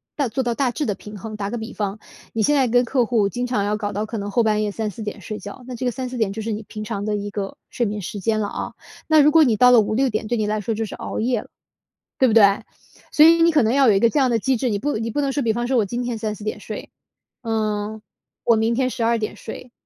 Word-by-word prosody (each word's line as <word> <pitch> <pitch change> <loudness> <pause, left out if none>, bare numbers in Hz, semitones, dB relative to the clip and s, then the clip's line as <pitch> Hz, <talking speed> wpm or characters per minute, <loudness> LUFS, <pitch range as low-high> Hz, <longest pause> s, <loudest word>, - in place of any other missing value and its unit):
大 280 -5 0
做 265 +4 -1
到 240 -2 -1
大 265 -3 +1
致 295 - -2
的 205 -3 -1
平 210 0 -10
衡。 215 +2 -7
打 200 -1 -3
个 240 - -3
比 220 +2 -6
方， 205 0 -3 0.3
你 225 - -1
现 295 +6 +3
在 260 -4 +3
跟 245 +1 +3
客 245 -1 +1
户 220 -4 +2
经 245 +5 -3
常 240 -5 0
要 210 +1 0
搞 205 -1 -3
到 210 +2 -2
可 225 +1 -5
能 205 0 -4
后 235 - +3
半 215 -1 +2
夜 210 - -1
3、4 215 0 -4
点 210 0 -5
睡 215 +2 -6
觉， 205 +5 -10
那 255 - -6
这 250 - -4
个 245 - +1
3、4 255 +1 -5
点 220 -4 +1
就 220 +2 -5
是 220 0 -2
你 215 - -5
平 215 0 -7
常 205 -2 -4
的 210 0 -1
一 205 0 -4
个 200 -1 -5
睡 240 - -1
眠 210 0 -3
时 200 +3 -6
间 215 +2 +1
了 210 - -1
啊。 - - -5 0.3
那 315 -1 +6
如 295 +1 +5
果 325 - +7
你 235 -7 +2
到 250 +4 +7
了 245 -2 +7
5、6 240 +6 +1
点 215 -1 -2
对 240 - 0
你 215 -1 0
来 215 0 -1
说 225 +3 -2
就 225 +1 -2
是 - - -7
熬 - - -5
夜 235 0 0
了。 - - -17 0.7
对 260 - +5
不 225 - +2
对？ 225 -3 +8 0.7
所 305 - +7
以 335 +1 +6
你 335 0 +6
可 300 -5 +4
能 225 +2 +2
要 270 -2 +5
有 - - +6
一 195 - +3
个 235 - +4
这 295 - -2
样 260 - +3
的 230 - +2
机 265 +5 +1
制， 250 +1 -1
你 205 - -1
不 290 +2 -1
你 225 +1 -3
不 290 - -2
能 275 -2 0
说， 285 - 0
比 225 - +2
方 240 +2 -2
说 265 - 0
我 225 - +4
今 240 +4 -3
天 240 -1 -3
3、4 215 -2 -4
点 215 - -3
睡， - - -7 0.5
呃， 215 -2 -2 0.4
我 235 - +5
明 225 +1 +1
天 255 +1 +1
12 235 -1 +1
点 215 -2 -4
睡， 240 +3 -9
225 Hz, 310 characters per minute, -22 LUFS, 210-250 Hz, 0.7 s, 对